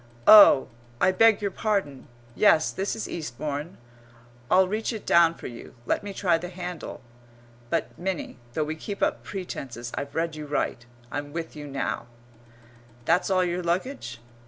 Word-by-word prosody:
"Oh, 205 -10 +9 0.3
I 185 - +4
beg 220 +2 +4
your 200 - 0
pardon! 190 - -2 0.3
Yes, 160 - +4
this 195 +1 -2
is 220 - -4
Eastbourne. 150 +2 -5 0.7
I'll 185 0 +5
reach 215 +5 -2
it 220 -3 -7
down 170 -1 +5
for - - -12
you. 120 -1 -9
Let - - 0
me 205 - -5
try 180 -4 +1
the 180 +1 -6
handle." 180 -2 -7 0.7
[But, 165 - -1
Minnie, 180 -8 -4
though 155 - 0
we 155 +1 -3
keep 200 +5 -5
up - - +1
pretences, 130 -11 -6
I've 140 0 -5
read 165 -1 -1
you 150 -1 -7
right 130 -4 -2 0.3
I'm 145 0 -5
with 165 -1 -5
you 150 -1 -7
now]. 135 -3 -3 1.0
"That's 175 +7 +2
all 185 -1 +3
your 175 0 -1
luggage?" 175 - -3
170 Hz, 160 wpm, -26 LUFS, 145-190 Hz, 1.0 s, Oh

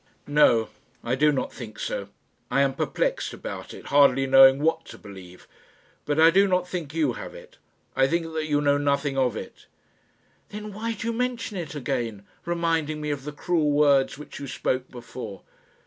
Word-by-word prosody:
"No; 145 -7 +4 0.3
I 120 - -1
do 150 +3 +4
not 140 - -2
think 110 -4 -9
so; 100 -1 -4 0.4
I 135 - +2
am 135 -1 +1
perplexed - - -1
about - - -7
it, - - -11
hardly 135 -2 +5
knowing 135 0 +7
what 160 +2 0
to - - -11
believe; 95 -3 -13 0.6
but 150 +1 0
I 165 +1 +7
do 195 +3 +4
not 180 -1 +1
think 170 -6 -5
you 150 -6 +1
have - - -8
it; - - -14 0.4
I 135 0 +4
think 165 +1 -2
that 155 -1 -2
you 145 -1 +1
know 145 -1 +2
nothing 140 -1 0
of 130 -4 +1
it." - - -10 0.8
"Then 210 0 -7
why 225 +3 -3
do 225 - -7
you 230 - -1
mention 240 -2 -2
it 165 -4 -5
again, 120 -7 -3 0.2
reminding 165 -3 -1
me 150 0 -3
of 140 -2 -5
the 150 - -4
cruel 155 +1 0
words 145 -2 +3
which 150 - -10
you 140 - -6
spoke 130 0 -2
before?" 120 -5 -9
145 Hz, 185 wpm, -25 LUFS, 135-165 Hz, 0.8 s, knowing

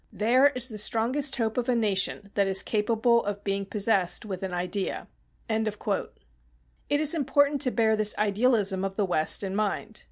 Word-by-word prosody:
There 255 +6 +3
is 255 -2 0
the 215 -4 -7
strongest 255 +6 +1
hope 225 -1 -2
of 245 +1 -3
a 250 - +2
nation 200 -2 -1
that 200 -1 +1
is 190 0 +5
capable 230 +2 +1
of 205 0 -5
being 195 -1 -3
possessed 195 -3 0
with 190 -3 -6
an 190 -1 -4
idea." 180 +2 -3 0.4
It 220 -1 -1 1.3
is 310 0 +4
important 285 -2 +1
to 265 - +2
bear 220 -2 +1
this 215 -1 0
idealism 210 -2 +1
of 195 0 -4
the 205 -1 0
West 165 0 +2
in 195 0 -4
mind. 215 +1 -3
215 Hz, 170 wpm, -26 LUFS, 195-240 Hz, 1.3 s, is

